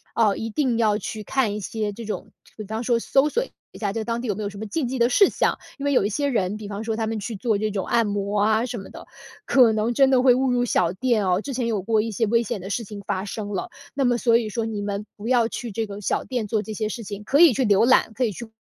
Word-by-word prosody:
呃， 215 Hz, -4 st, +3 dB
一 225 Hz, -, -4 dB
定 250 Hz, 0 st, 0 dB
要 215 Hz, -3 st, +2 dB
去 215 Hz, +1 st, -6 dB
看 220 Hz, -2 st, 0 dB
一 -, -, -3 dB
些 210 Hz, +1 st, -3 dB
这 230 Hz, +3 st, -8 dB
种 210 Hz, 0 st, -5 dB, 0.3 s
比 215 Hz, -, -5 dB
方 220 Hz, +3 st, -4 dB
说 235 Hz, -1 st, +2 dB
搜 270 Hz, +5 st, +2 dB
索 475 Hz, +11 st, 0 dB, 0.3 s
一 -, -, -12 dB
下 205 Hz, -3 st, -2 dB
在 225 Hz, -, -2 dB
当 230 Hz, +1 st, -2 dB
地 250 Hz, -, -4 dB
有 205 Hz, -, 0 dB
没 215 Hz, -, -4 dB
有 205 Hz, -, -2 dB
什 200 Hz, -, -11 dB
么 220 Hz, -, -5 dB
禁 270 Hz, +5 st, -2 dB
忌 260 Hz, +1 st, -3 dB
的 235 Hz, +1 st, +4 dB
事 395 Hz, +10 st, +5 dB
项。 -, -, 0 dB, 0.2 s
因 280 Hz, -, -5 dB
为 285 Hz, -, +2 dB
有 225 Hz, -, +3 dB
一 -, -, 0 dB
些 285 Hz, +7 st, -1 dB
人， 210 Hz, -6 st, 0 dB
比 215 Hz, -1 st, -8 dB
方 205 Hz, +1 st, -5 dB
说 225 Hz, -1 st, -2 dB
他 220 Hz, 0 st, -2 dB
们 220 Hz, 0 st, -2 dB
去 220 Hz, +2 st, -5 dB
做 215 Hz, +2 st, 0 dB
这 215 Hz, +1 st, -1 dB
种 195 Hz, -2 st, -2 dB
按 230 Hz, -1 st, +2 dB
摩 205 Hz, 0 st, -1 dB
啊， 220 Hz, +2 st, +2 dB
什 245 Hz, -1 st, -5 dB
么 195 Hz, -, -8 dB
的， -, -, -12 dB, 0.4 s
可 250 Hz, -4 st, +5 dB
能 220 Hz, +2 st, 0 dB
真 270 Hz, +2 st, +4 dB
的 260 Hz, -2 st, +4 dB
会 255 Hz, -1 st, +6 dB
误 260 Hz, 0 st, +1 dB
入 245 Hz, 0 st, +2 dB
小 175 Hz, -7 st, +1 dB
店 230 Hz, 0 st, +1 dB
哦。 180 Hz, +1 st, +2 dB
之 275 Hz, +4 st, -5 dB
前 245 Hz, -2 st, -1 dB
有 215 Hz, -4 st, -1 dB
过 220 Hz, +3 st, +2 dB
一 225 Hz, +1 st, -3 dB
些 225 Hz, +2 st, 0 dB
危 230 Hz, +2 st, +3 dB
险 220 Hz, -2 st, -4 dB
的 190 Hz, -, -7 dB
事 230 Hz, +3 st, -2 dB
情 205 Hz, 0 st, -8 dB
发 190 Hz, +1 st, -2 dB
生 205 Hz, 0 st, -5 dB
了。 195 Hz, -3 st, -3 dB, 0.2 s
那 275 Hz, -1 st, 0 dB
么 245 Hz, -1 st, +3 dB
所 230 Hz, -1 st, +4 dB
以 230 Hz, -2 st, -2 dB
说 225 Hz, +1 st, -2 dB
你 215 Hz, -2 st, -3 dB
们 200 Hz, 0 st, -3 dB
不 210 Hz, +2 st, -7 dB
要 240 Hz, -2 st, +3 dB
去 235 Hz, 0 st, -6 dB
这 225 Hz, +2 st, -2 dB
个 200 Hz, 0 st, -7 dB
小 -, -, -1 dB
店 245 Hz, -4 st, -3 dB
做 215 Hz, +1 st, 0 dB
这 220 Hz, 0 st, -7 dB
些 215 Hz, +1 st, -2 dB
事 230 Hz, +2 st, -5 dB
情， 205 Hz, 0 st, -7 dB
可 275 Hz, +7 st, +2 dB
以 335 Hz, -6 st, +8 dB
去 260 Hz, +2 st, +1 dB
浏 205 Hz, 0 st, +4 dB
览， 250 Hz, -2 st, +4 dB
可 255 Hz, -, -1 dB
以 220 Hz, -, -1 dB
去 235 Hz, +5 st, -8 dB
220 Hz, 330 characters per minute, -23 LUFS, 205-245 Hz, 0.4 s, 以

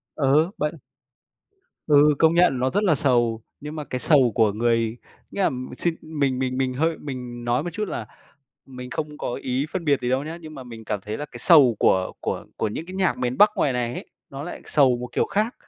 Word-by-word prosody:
Ừ, 150 Hz, +4 st, +3 dB
bận. 150 Hz, +2 st, -1 dB, 1.1 s
Ừ, 150 Hz, 0 st, +5 dB
công 160 Hz, 0 st, +4 dB
nhận 175 Hz, -7 st, +4 dB
nó 130 Hz, +1 st, +1 dB
rất 205 Hz, +2 st, 0 dB
là 170 Hz, -6 st, +4 dB
sầu, 120 Hz, -5 st, +1 dB, 0.2 s
nhưng 150 Hz, +2 st, -7 dB
mà 150 Hz, -, -4 dB
cái 125 Hz, -, -4 dB
sầu 130 Hz, -5 st, +4 dB
của 110 Hz, -4 st, +3 dB
người, 115 Hz, +1 st, 0 dB, 0.3 s
nghĩa 200 Hz, -, -2 dB
là -, -, +3 dB, 0.3 s
xin 170 Hz, -2 st, 0 dB
mình 140 Hz, -5 st, -1 dB
mình 130 Hz, 0 st, -2 dB
mình 130 Hz, -1 st, 0 dB
hơi 160 Hz, +4 st, 0 dB
mình 125 Hz, -4 st, -7 dB
nói 120 Hz, +3 st, +1 dB
một 175 Hz, -, -4 dB
chút 210 Hz, 0 st, -3 dB
là 110 Hz, -, -4 dB, 0.6 s
mình 125 Hz, -1 st, -9 dB
không 150 Hz, +2 st, -5 dB
có 120 Hz, -, -3 dB
ý 130 Hz, +3 st, -1 dB
phân 180 Hz, -3 st, -3 dB
biệt 140 Hz, -3 st, +2 dB
gì 125 Hz, -, -2 dB
đâu 135 Hz, +2 st, 0 dB
nhá, 165 Hz, +2 st, -6 dB
nhưng 155 Hz, -1 st, -10 dB
mà 135 Hz, -, -8 dB
mình 115 Hz, -2 st, -10 dB
cảm 105 Hz, -2 st, -3 dB
thấy 105 Hz, +2 st, -5 dB
là 150 Hz, -, -4 dB
cái 120 Hz, -4 st, -11 dB
sầu 130 Hz, -, +6 dB
của 95 Hz, 0 st, +2 dB
của -, -, -3 dB
của 110 Hz, -, -1 dB
những 160 Hz, +10 st, -6 dB
cái 185 Hz, -, -9 dB
nhạc 190 Hz, -3 st, +1 dB
miền 125 Hz, 0 st, -2 dB
Bắc 210 Hz, 0 st, +7 dB
ngoài 135 Hz, -, +2 dB
này 120 Hz, 0 st, -2 dB
ấy, -, -, -7 dB, 0.2 s
nó 140 Hz, +1 st, -7 dB
lại 175 Hz, -, -7 dB
sầu 135 Hz, -5 st, +4 dB
một 125 Hz, 0 st, -6 dB
kiểu -, -, +1 dB
khác, 215 Hz, +4 st, -1 dB
135 Hz, 235 wpm, -23 LUFS, 120-155 Hz, 1.1 s, Bắc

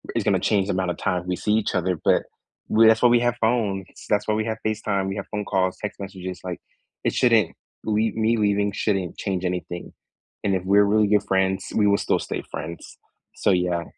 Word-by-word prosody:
is -, -, +1 dB
gonna -, -, +2 dB
change 100 Hz, -2 st, +1 dB
the -, -, 0 dB
amount 95 Hz, -1 st, 0 dB
of -, -, -6 dB
time 90 Hz, -1 st, -2 dB
we 90 Hz, -, 0 dB
see 105 Hz, -, -1 dB
each 110 Hz, -2 st, 0 dB
other, 90 Hz, -2 st, 0 dB
but, -, -, +3 dB, 0.5 s
we 110 Hz, +1 st, +6 dB
that's 110 Hz, 0 st, +5 dB
why 125 Hz, -, +6 dB
we 120 Hz, -, +5 dB
have 120 Hz, 0 st, +1 dB
phones, 110 Hz, -5 st, +1 dB, 0.2 s
that's 105 Hz, 0 st, +1 dB
why 110 Hz, -, +2 dB
we 110 Hz, +1 st, 0 dB
have 110 Hz, -1 st, -2 dB
FaceTime, 105 Hz, -3 st, -1 dB
we 95 Hz, -, -4 dB
have 100 Hz, -, -5 dB
phone 105 Hz, -1 st, -2 dB
calls, 95 Hz, -2 st, 0 dB
text 105 Hz, -, -5 dB
messages, 95 Hz, -2 st, -6 dB
like, 90 Hz, -1 st, -5 dB, 0.4 s
it -, -, 0 dB
shouldn't 115 Hz, -7 st, +3 dB, 0.3 s
leave 110 Hz, 0 st, 0 dB
me 115 Hz, +1 st, +2 dB
leaving 100 Hz, -1 st, +1 dB
shouldn't 95 Hz, -3 st, -1 dB
change 95 Hz, -2 st, -2 dB
anything. 90 Hz, -1 st, -4 dB, 0.5 s
And 100 Hz, -2 st, +1 dB
if 90 Hz, -, -2 dB
we're 100 Hz, +2 st, +5 dB
really 105 Hz, +1 st, +3 dB
good 105 Hz, 0 st, +3 dB
friends, 95 Hz, 0 st, 0 dB
we 105 Hz, -2 st, +3 dB
will 100 Hz, -, +4 dB
still -, -, 0 dB
stay -, -, -4 dB
friends. 85 Hz, +1 st, -7 dB, 0.4 s
So, -, -, 0 dB
yeah, 90 Hz, -2 st, +1 dB
100 Hz, 220 wpm, -24 LUFS, 95-110 Hz, 0.5 s, we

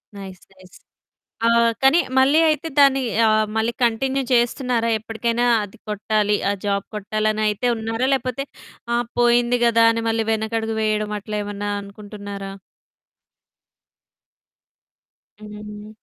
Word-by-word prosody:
Nice. 190 Hz, -2 st, -10 dB
Nice. 185 Hz, -1 st, -18 dB, 0.7 s
ఆహ్, 230 Hz, 0 st, +4 dB
కానీ 270 Hz, +5 st, +5 dB, 0.2 s
మళ్ళీ 275 Hz, +4 st, +5 dB
అయితే 305 Hz, +1 st, -1 dB
దాన్ని 275 Hz, -1 st, +5 dB, 0.3 s
ఆహ్ 215 Hz, 0 st, +3 dB
మళ్ళీ 225 Hz, +2 st, 0 dB
కంటిన్యూ 260 Hz, +4 st, +1 dB
చేస్తున్నారా? 240 Hz, -1 st, +1 dB
ఎప్పటికైనా 230 Hz, +2 st, -2 dB, 0.2 s
అది 205 Hz, +3 st, -11 dB
కొట్టాలి. 210 Hz, 0 st, 0 dB
ఆ -, -, +2 dB
జాబ్ 200 Hz, -1 st, -1 dB
కొట్టాలనయితే 215 Hz, +2 st, -1 dB
ఉన్నారా? 225 Hz, +3 st, -2 dB
లేకపోతే 265 Hz, 0 st, -2 dB, 0.5 s
ఆ -, -, +2 dB, 0.2 s
పోయింది 240 Hz, 0 st, +3 dB
గదా! 230 Hz, -1 st, +4 dB
అని 230 Hz, 0 st, -3 dB
మళ్ళీ 225 Hz, 0 st, 0 dB
వెనకడుగు 220 Hz, 0 st, -2 dB
వేయడం 215 Hz, -1 st, -1 dB
అట్లా 210 Hz, +1 st, -5 dB
ఏమన్నా 205 Hz, 0 st, -5 dB
అనుకుంటున్నారా? 200 Hz, -1 st, -9 dB, 2.9 s
హ్మ్. 210 Hz, 0 st, -10 dB
220 Hz, 110 wpm, -21 LUFS, 210-240 Hz, 2.9 s, కానీ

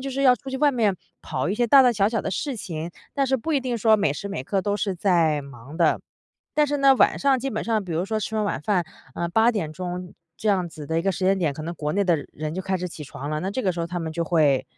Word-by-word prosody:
就 275 Hz, -, -4 dB
是 275 Hz, +1 st, -2 dB
要 255 Hz, -2 st, +7 dB
出 270 Hz, -, -11 dB
去 265 Hz, -, -3 dB
外 295 Hz, 0 st, +4 dB
面， 220 Hz, -7 st, +1 dB, 0.3 s
跑 -, -, -3 dB
一 200 Hz, -, 0 dB
些 240 Hz, -, +2 dB
大 270 Hz, +3 st, +8 dB
大 250 Hz, -1 st, +4 dB
小 200 Hz, -1 st, +2 dB
小 225 Hz, -1 st, -1 dB
的 195 Hz, -, -2 dB
事 275 Hz, +5 st, -2 dB
情， 170 Hz, -3 st, -5 dB, 0.2 s
但 275 Hz, -1 st, +1 dB
是 265 Hz, +1 st, +2 dB
不 320 Hz, +7 st, -3 dB
一 285 Hz, -, +3 dB
定 250 Hz, -2 st, -2 dB
说 220 Hz, -1 st, +4 dB
每 175 Hz, -9 st, +1 dB
时 200 Hz, +7 st, -6 dB
每 130 Hz, -10 st, -4 dB
刻 195 Hz, +3 st, 0 dB
都 205 Hz, -1 st, 0 dB
是 200 Hz, -3 st, -1 dB
在 165 Hz, -5 st, +2 dB
忙 140 Hz, +2 st, -11 dB
的。 165 Hz, -3 st, +3 dB, 0.6 s
但 300 Hz, -, +4 dB
是 290 Hz, 0 st, -1 dB
呢， 275 Hz, -1 st, +6 dB
晚 -, -, +3 dB
上 275 Hz, -1 st, +3 dB
基 270 Hz, -, -2 dB
本 220 Hz, -, -3 dB
上 220 Hz, -3 st, 0 dB
比 180 Hz, -, -9 dB
如 165 Hz, +3 st, 0 dB
说 215 Hz, +1 st, -2 dB
吃 220 Hz, +1 st, -3 dB
完 215 Hz, -, +1 dB
晚 175 Hz, -9 st, -2 dB
饭， 185 Hz, -3 st, +1 dB, 0.3 s
呃， 170 Hz, 0 st, -1 dB
8 225 Hz, +6 st, +4 dB
点 195 Hz, -10 st, -3 dB
钟 180 Hz, +1 st, -6 dB, 0.2 s
这 215 Hz, -, -2 dB
样 185 Hz, -4 st, +2 dB
子 150 Hz, -3 st, -9 dB
的 160 Hz, -, -2 dB
一 -, -, -5 dB
个 195 Hz, -, +2 dB
时 185 Hz, 0 st, -3 dB
间 195 Hz, +1 st, +4 dB
点， 160 Hz, -5 st, +1 dB
可 155 Hz, +2 st, -7 dB
能 170 Hz, +2 st, -4 dB
国 150 Hz, -1 st, -3 dB
内 200 Hz, 0 st, +1 dB
的 175 Hz, -3 st, +3 dB, 0.2 s
人 155 Hz, +1 st, -5 dB
就 190 Hz, -, -3 dB
开 190 Hz, 0 st, -1 dB
始 180 Hz, 0 st, -4 dB
起 155 Hz, -, -9 dB
床 140 Hz, 0 st, -7 dB
了， 155 Hz, 0 st, -2 dB
那 190 Hz, -, -2 dB
这 255 Hz, -, -2 dB
个 185 Hz, -, +1 dB
时 170 Hz, -, -4 dB
候 165 Hz, -, -1 dB
他 175 Hz, 0 st, -3 dB
们 160 Hz, -1 st, -4 dB
就 170 Hz, -, -1 dB
会 150 Hz, -5 st, +3 dB
190 Hz, 325 characters per minute, -24 LUFS, 165-225 Hz, 0.6 s, 大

